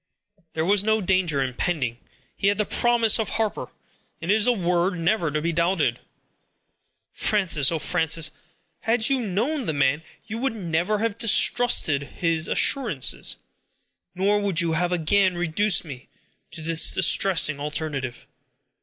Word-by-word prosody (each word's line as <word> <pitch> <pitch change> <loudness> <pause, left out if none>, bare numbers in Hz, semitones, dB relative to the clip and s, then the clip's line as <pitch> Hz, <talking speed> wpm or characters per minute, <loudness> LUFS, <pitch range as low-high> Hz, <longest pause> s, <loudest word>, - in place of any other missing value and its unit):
"There 160 0 -2
was 200 +2 +2
no 220 +1 +1
danger 180 -7 0
impending. 130 -2 -2 0.4
He 195 - -1
had 205 - +1
the 210 - 0
promise 235 -1 +3
of 220 - -2
Harper; 220 -2 -2 0.5
and 170 +3 -2
it - - +5
is 220 +2 +3
a - - +5
word 180 -3 0
never 170 0 0
to 150 +1 -3
be 170 0 -1
doubted. 170 +4 0
O - - -29 1.1
Frances! 170 -9 +2
Frances! 160 0 -1 0.5
had 225 +1 +1
you 270 -1 +2
known 235 - -2
the 160 - -1
man, 140 +2 +1 0.2
you 225 +1 -6
would 265 -2 -2
never 180 +1 -2
have 225 0 -3
distrusted 230 - +3
his 165 +3 -1
assurance; 225 - 0 0.8
nor 200 +3 +1
would 200 -4 0
you 170 -2 +1
have 175 +2 -1
again 180 +2 +1
reduced 175 +3 +1
me 135 -4 -11 0.4
to 160 - -8
this 165 0 +3
distressing 185 -5 +3
alternative." 145 -4 -5
180 Hz, 145 wpm, -23 LUFS, 160-210 Hz, 1.1 s, it